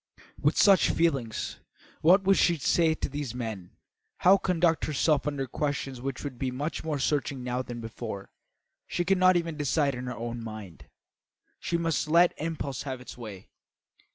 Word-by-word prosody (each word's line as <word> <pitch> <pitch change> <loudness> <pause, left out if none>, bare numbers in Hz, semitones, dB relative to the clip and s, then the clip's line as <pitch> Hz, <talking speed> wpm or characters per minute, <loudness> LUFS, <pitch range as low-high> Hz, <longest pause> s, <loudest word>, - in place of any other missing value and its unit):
With 150 +2 +2
such 195 -4 +6
feelings, 135 -9 0 0.4
what 185 +5 +6
should 195 0 +5
she 170 -1 +3
say 160 +2 +2
to - - -3
these 145 -4 -5
men; 110 -7 -5 0.4
how 190 +2 +6
conduct 175 -4 +1
herself 150 0 +1
under 140 -2 -1
questions 135 -1 -3
which 135 -1 -4
would 135 -4 -6
be 130 - -1
much 140 +6 -4
more 155 -2 -1
searching 140 -2 -1
now 125 0 -1
than 120 -2 -7
before? 110 -3 -7 0.6
She 175 - -1
could 190 +1 +2
not 185 -1 +6
even 165 -2 -3
decide 145 0 +1
in 125 0 -5
her 125 - -5
own 115 +1 -5
mind. 110 -6 -9 0.7
She 170 - -1
must 165 -2 0
let 170 +3 +5
impulse 150 -4 -3
have 130 -2 -5
its 125 - -10
way. 105 -6 -10
140 Hz, 170 wpm, -28 LUFS, 125-165 Hz, 0.7 s, such